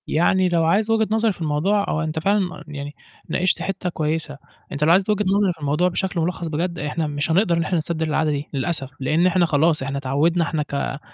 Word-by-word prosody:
يعني 185 +3 +2
لو 170 -2 +2
عايز 205 +7 +2
وجهة 220 -1 +2
نظري 220 -1 +2
في 175 - -15
الموضوع 170 +7 +1
أو 155 - -1
أنت 155 0 -2
فعلًا 195 +1 0
يعني 145 -1 -7 0.3
ناقشت 185 0 +1
حِتّة 195 -1 -3
كويسة، 155 -2 -2 0.3
أنت 145 +1 -2
لو 160 - +4
عايز 190 +3 +3
وجهة 210 0 +1
نظري 195 -1 +2
في 165 - -22
الموضوع 150 +4 +1
بشكل 180 0 -2
ملخص 170 +1 -2
بجد، 170 +3 -2
إحنا 150 +2 -2
مش 145 +2 -2
هنقدر 175 0 +3
إن 165 - +1
إحنا 175 +3 -1
نستبدل 160 0 -2
العادة 155 0 +1
دي 145 0 -4
للأسف، 135 -1 -2
لإن 155 +7 +2
إحنا 180 -1 +3
خلاص 155 -1 +2
إحنا 135 +1 -3
اتعوّدنا 145 +6 +1
إحنا 160 -2 -1
ك 140 -1 -3
165 Hz, 215 wpm, -22 LUFS, 150-185 Hz, 0.3 s, لو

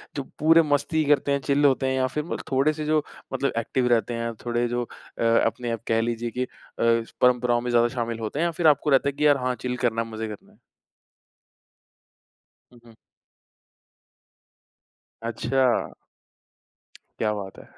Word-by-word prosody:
जो 140 - -2 0.2
पूरे 165 +2 +6
मस्ती 155 +1 +1
करते 145 -1 +2
हैं, 140 - +2
चिल 140 +1 +2
होते 135 -1 +3
हैं 130 - 0
या 130 0 +2
फिर 150 +2 -2 0.2
थोड़े-से 150 +3 +1
जो 155 0 +2 0.3
मतलब 135 +1 0
एक्टिव 125 +2 0
रहते 120 0 +2
हैं, 115 0 -3
थोड़े 120 0 0
जो 120 +1 -1 0.4
अ, - - 0
अपने 115 +1 +1
आप 115 -1 -4
कह 115 0 +2
लीजिए 120 0 -2
की 125 +2 -2
अ, - - -5 0.3
परंपराओं 120 +1 +2
में 125 - -3
ज़्यादा 120 0 +4
शामिल 115 -1 -2
होते 110 +6 -4
हैं 170 - +2
या 170 - 0
फिर 165 - +5
आपको 150 0 +3
रहता 140 0 +4
है - - -5
कि 150 +2 +2
यार 145 -1 +5
हाँ, 125 -1 -1
चिल 125 +1 -4
करना 115 -2 0
है 115 - -4
मज़े 110 0 -4
करना 105 -1 -10
है। - - -25 2.2
हुँ, 120 - -17
हुँ। 115 - -16 2.3
अच्छा। 125 +2 0 1.3
क्या 105 -1 +1
बात 100 -2 -7
है। - - -15
125 Hz, 170 wpm, -25 LUFS, 115-140 Hz, 2.3 s, पूरे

